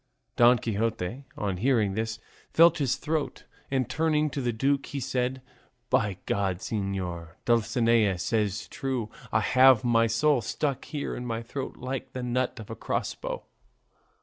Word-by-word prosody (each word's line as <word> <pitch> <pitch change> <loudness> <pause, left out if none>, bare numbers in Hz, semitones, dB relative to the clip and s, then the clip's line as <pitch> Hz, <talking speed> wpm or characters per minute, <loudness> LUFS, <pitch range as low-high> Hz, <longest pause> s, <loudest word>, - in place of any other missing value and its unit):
Don 120 +1 +6
Quixote 115 +2 -2
on 100 -3 -2
hearing 110 -2 +2
this 110 +2 -2 0.3
felt 170 0 +5
his 135 -4 +1
throat, 155 -1 -2 0.3
and 130 -3 0
turning 155 -1 +1
to 140 - -3
the 120 -1 0
duke 135 +5 0
he 140 - -4
said, 130 0 -2 0.5
"By 100 -3 +2
God, 95 -3 0
señor, 90 -5 -4
Dulcinea 115 -3 +3
says 105 +1 -1
true, 125 -5 -3 0.2
I 110 - +3
have 130 +1 +6
my 115 -1 +4
soul 130 +4 +3
stuck 135 +5 -2
here 145 -3 -4
in 125 - -5
my 115 0 -3
throat 135 +3 -5
like 130 +1 -5
the 130 - -4
nut 125 0 -1
of 110 - -9
a - - -4
crossbow." - - -3
120 Hz, 150 wpm, -27 LUFS, 105-135 Hz, 0.5 s, Don